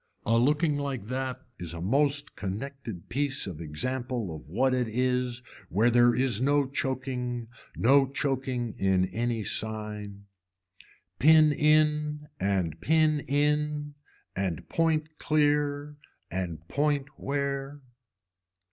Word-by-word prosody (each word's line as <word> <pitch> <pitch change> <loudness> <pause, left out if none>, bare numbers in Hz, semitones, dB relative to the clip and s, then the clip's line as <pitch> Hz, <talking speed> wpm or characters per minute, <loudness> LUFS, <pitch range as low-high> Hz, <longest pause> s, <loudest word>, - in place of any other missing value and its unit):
A 115 - +3
looking 145 +5 +2
like 135 -7 -4
that 130 0 -3
is 85 -1 -6
a - - -6
most 140 - +1
connected 110 0 -6
piece 140 +1 -1
of 85 -5 -7
example 115 - -3
of 75 - -11
what 130 +9 +2
it 125 -2 +1
is 125 +1 0 0.3
where 110 +6 +3
there 120 0 +5
is 125 -4 +1
no 145 +1 +3
choking, 130 -3 -3 0.3
no 135 +3 +4
choking 130 -4 -2
in 95 -1 +3
any 115 -1 -1
sign. 105 -2 -2 0.9
Pin 155 0 +7
in 150 0 +2
and 90 -5 -1
pin 155 - +3
in 150 +1 0 0.4
and 95 -5 -2
point 155 -2 0
clear 145 -1 +1 0.3
and 85 -3 -4
point 145 +1 0
where. 140 0 -2
130 Hz, 115 wpm, -28 LUFS, 110-145 Hz, 0.9 s, Pin